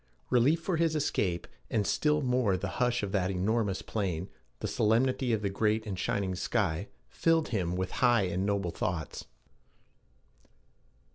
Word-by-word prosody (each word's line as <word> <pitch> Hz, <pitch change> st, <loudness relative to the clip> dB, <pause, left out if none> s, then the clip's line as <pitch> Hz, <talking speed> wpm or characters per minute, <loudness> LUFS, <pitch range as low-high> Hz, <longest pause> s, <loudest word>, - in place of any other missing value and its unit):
Relief 130 Hz, +7 st, +4 dB
for 170 Hz, 0 st, -1 dB
his 165 Hz, -1 st, +2 dB
escape, 95 Hz, -, 0 dB, 0.2 s
and 105 Hz, -2 st, +1 dB
still 150 Hz, -1 st, +2 dB
more 125 Hz, -7 st, +2 dB
the 100 Hz, -, -3 dB
hush 125 Hz, -2 st, +2 dB
of 100 Hz, -, -2 dB
that 95 Hz, -3 st, +1 dB
enormous 100 Hz, +1 st, 0 dB
plain, 95 Hz, -4 st, -2 dB, 0.3 s
the -, -, -3 dB
solemnity 125 Hz, +3 st, +2 dB
of 110 Hz, -2 st, 0 dB
the 100 Hz, -, +1 dB
great 110 Hz, +2 st, +1 dB
and 95 Hz, -4 st, -4 dB
shining 95 Hz, -2 st, -1 dB
sky, 95 Hz, -1 st, -1 dB, 0.2 s
filled 165 Hz, +4 st, +1 dB
him 90 Hz, -6 st, -1 dB
with 95 Hz, 0 st, -2 dB
high 120 Hz, -4 st, +5 dB
and 90 Hz, 0 st, -1 dB
noble 100 Hz, -3 st, 0 dB
thoughts. 80 Hz, -2 st, -3 dB
105 Hz, 150 wpm, -30 LUFS, 95-125 Hz, 0.3 s, high